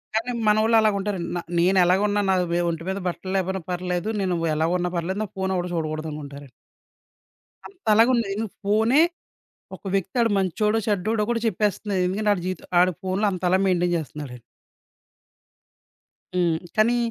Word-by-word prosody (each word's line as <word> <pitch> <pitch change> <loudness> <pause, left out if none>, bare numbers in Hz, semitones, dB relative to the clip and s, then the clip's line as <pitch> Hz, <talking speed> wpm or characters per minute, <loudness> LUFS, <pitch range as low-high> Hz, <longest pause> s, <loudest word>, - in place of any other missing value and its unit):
కానీ 225 +3 0 0.2
మనోళ్ళు 215 +2 +4
అలాగుంటారండి. 200 -4 0
న - - -1 0.2
నేనేలాగున్నా 190 +3 +3
నా 190 - +4 0.2
మీద 175 - +1
ఒంటి 165 -1 -4
మీద 190 +1 -2
బట్టలు 185 +1 -4
లేకపోయినా 190 0 -1
పర్లేదు. 180 +2 -2
నేను 185 -2 0 0.2
ఎలాగున్నా 175 +3 0
పర్లేదు. 185 +4 -2
నా - - -4
ఫోను 190 0 -1
ఎవడు 180 0 -2
చూడకూడదనుకుంటారండి. 155 -3 -5 1.2
అంతలాగా 230 - +3
ఉంది. 230 -3 0
ఎందుకు 220 -2 -4
ఫోనే 220 +8 +4 0.8
ఒక - - -31
వ్యక్తి 195 +3 -1
ఆడు 230 -1 +3
మంచోడో? 210 +4 +1
చెడ్డోడో? 210 +2 0
గూడా 235 -1 0
చెప్పేస్తుంది. 205 -1 -1
ఎందుకంటే 205 +4 -1
వాడి 180 -4 -2
జీవితం 185 -2 -4
వాడు 180 +1 +4
ఫోన్లో 190 +3 0
అంతలా 185 0 +1
మెయింటైన్ 175 -1 +2
చేస్తున్నాడండి. 145 -5 -7 1.9
హ్మ్, 170 -3 +2 0.2
కానీ 235 +3 +4
190 Hz, 140 wpm, -24 LUFS, 175-210 Hz, 1.9 s, మనోళ్ళు